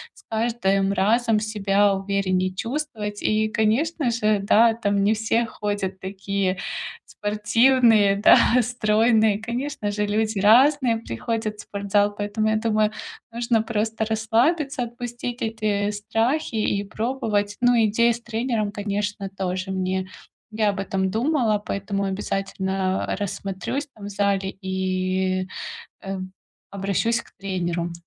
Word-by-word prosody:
с - - -19
каждым 220 -4 +1
разом 220 +3 +2
себя 205 -2 +2
увереннее 195 -1 0
чувствовать. 225 -2 -4
И, 215 0 +1
конечно 245 +7 +1
же, 215 -3 +1
да, 225 +3 +5
там 205 -3 0
не 205 +2 +4
все 225 +2 +1
ходят 205 -4 -3
такие 195 0 -2 0.5
спортивные, 215 0 +3
да, 205 - +7 0.2
стройные, 220 -2 +2
конечно 235 -1 -3
же, 210 0 -1
люди 215 0 0
разные 245 +3 +5
приходят 220 - -3
в - - -8
спортзал, 205 0 0
поэтому, 210 +1 -1
я 220 - +2
думаю, 215 -1 +1 0.4
нужно 235 -1 +1
просто 220 0 -1
расслабиться, 245 +6 +1
отпустить 240 +1 -6
эти 215 -3 -1
страхи 225 +8 -1
и 205 -2 0
пробовать. 215 -2 -2
Ну, 245 0 +5
идея 235 +3 +3
с 235 - -8
тренером, 230 -2 -2
конечно, 205 -1 -3
тоже 190 0 -3
мне 185 0 -1 0.4
я 215 -1 +1
об 200 -1 -3
этом 190 -1 -1
думала, 230 0 +1
поэтому 200 -1 -3
обязательно, 190 -1 -2
э, - - 0
рассмотрюсь 200 +7 -4
там 210 -4 -11
в 205 - -5
зале 200 -1 0
и, 185 0 -1 0.6
э, 195 0 -4 0.5
обращусь 200 +4 0
к - - -21
тренеру. 175 -3 -2
210 Hz, 125 wpm, -23 LUFS, 195-230 Hz, 0.6 s, да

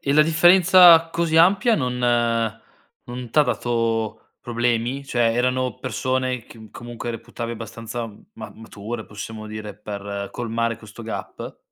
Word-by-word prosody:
E 140 - -1
la 150 - +6
differenza 170 +1 +6
così 165 -1 0
ampia, 195 +7 +5
non 125 -5 -2 1.1
non 120 -1 -7
t'ha 150 - +4
dato 115 -3 -2
problemi? 120 +3 -1
Cioè, 120 -3 +1
erano 125 -1 0
persone 130 0 -2
che 110 -2 -14
comunque 120 0 -7
reputavi 115 +1 -6
abbastanza 115 +1 -6 0.3
ma - - -9
mature, 110 +1 -7
possiamo 110 +1 -8
dire, 105 -1 -7
per 100 -1 -6
colmare 115 -1 -2
questo 110 +1 -12
gap? 110 - -7
120 Hz, 130 wpm, -22 LUFS, 110-135 Hz, 1.1 s, la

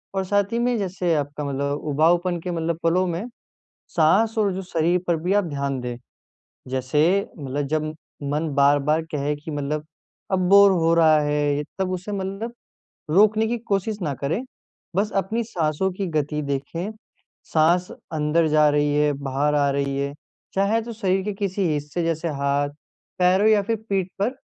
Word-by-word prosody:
और 190 - +1
साथ 205 +2 +1
ही 235 - +1
में 245 0 +1
जैसे 185 -4 -1
आपका 145 0 -3
मतलब 140 +1 -2
उबाऊपन 175 +4 +2
के 180 - -4
मतलब 165 -1 -2
पलों 175 +3 +3
में 175 +4 -3 0.7
साँस 195 +8 +3
और 205 -2 +2
जो 190 - -4
शरीर 175 0 +1
पर 170 - +2
भी 180 - 0
आप 205 -1 +3
ध्यान 140 -4 -2
दें। 125 -1 -4 0.7
जैसे 130 +3 0 0.4
मतलब 140 0 -3
जब 155 +1 -1 0.4
मन 155 +2 -1
बार-बार 145 +2 +3
कहें 145 0 -1
कि 150 +2 -8
मतलब 150 +1 -3 0.5
अब 190 - +2
बोर 200 0 +8
हो 165 -3 +2
रहा 160 -2 +5
है, 145 0 0 0.2
तब 190 -1 0
उसे 185 +3 -4
मतलब 195 +4 -4 0.6
रोकने 215 +5 +4
की 240 - -1
कोशिश 210 -1 -1
ना 150 -4 -1
करे। 165 - -1 0.5
बस 210 +2 +1
अपनी 195 +5 0
साँसों 170 -3 -1
की 195 +2 -3
गति 150 0 0
देखें, 140 +7 -3 0.5
साँस 170 +3 +2 0.2
अंदर 155 +2 +2
जा 150 0 +5
रही 145 0 +1
है, 150 0 +3
बाहर 140 +1 -1
आ 145 -1 +3
रही 140 0 -1
है, 140 0 -2 0.4
चाहे 200 +4 +2
तो 235 +1 -7
शरीर 195 -4 0
के 210 - -2
किसी 195 -1 -1
हिस्से 150 +3 -3
जैसे 165 0 -1
हाथ, 140 -1 0 0.5
पैरों 185 +4 +4
या 210 -2 +4
फ़िर 225 +3 -1
पीठ 190 -2 0
पर 240 +6 +1
165 Hz, 170 wpm, -23 LUFS, 145-195 Hz, 0.7 s, बोर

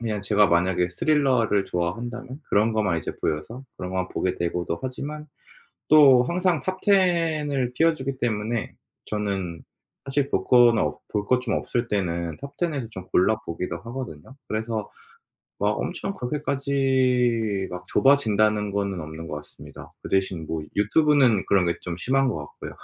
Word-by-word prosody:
그냥 110 -3 -2
제가 105 +1 +3
만약에 90 +1 +2
스릴러를 130 - +2
좋아한다면 120 - -4
그런 110 +3 +3
것만 100 -6 +1
이제 - - -5
보여서 95 - -3
그런 90 - -5
것만 95 0 -1
보게 90 - -1
되고도 85 0 -2
하지만 145 +4 -5 0.6
또 140 -5 +7
항상 175 +3 +1
톱 185 0 -3
10 170 -6 +2
을 130 -3 -1
띄워주기 135 -4 +1
때문에 110 0 -2 0.3
저는 100 -5 -3 0.4
사실 140 0 0
볼 - - 0
거나 120 -2 +5
없 - - -2
볼 105 -1 -1
것 125 0 +3
좀 115 - -1
없을 120 0 -1
때는 85 -5 -2
톱 140 0 -9
10 175 -2 -1
에서 130 -5 -3
좀 95 -4 -8
골라 105 +4 +4
보기도 85 +2 -4
하거든요. 120 - -8
그래서 110 -1 -3 0.7
막 105 +1 +1
엄청 195 +2 -3
'그렇게까지 130 - 0
막 90 0 -7
좁아진다.'는 110 -6 +3
거는 100 -2 -2
없는 80 +1 -8
것 75 - -4
같습니다. 75 - -13
그 - - -7
대신 95 -4 0
뭐 80 -1 -3
유튜브는 125 0 +3
그런 95 -3 +3
게 85 - +1
좀 90 -2 -5
심한 135 +8 +1
것 125 - -1
같고요. 75 0 -9
115 Hz, 320 characters per minute, -24 LUFS, 95-135 Hz, 0.7 s, 또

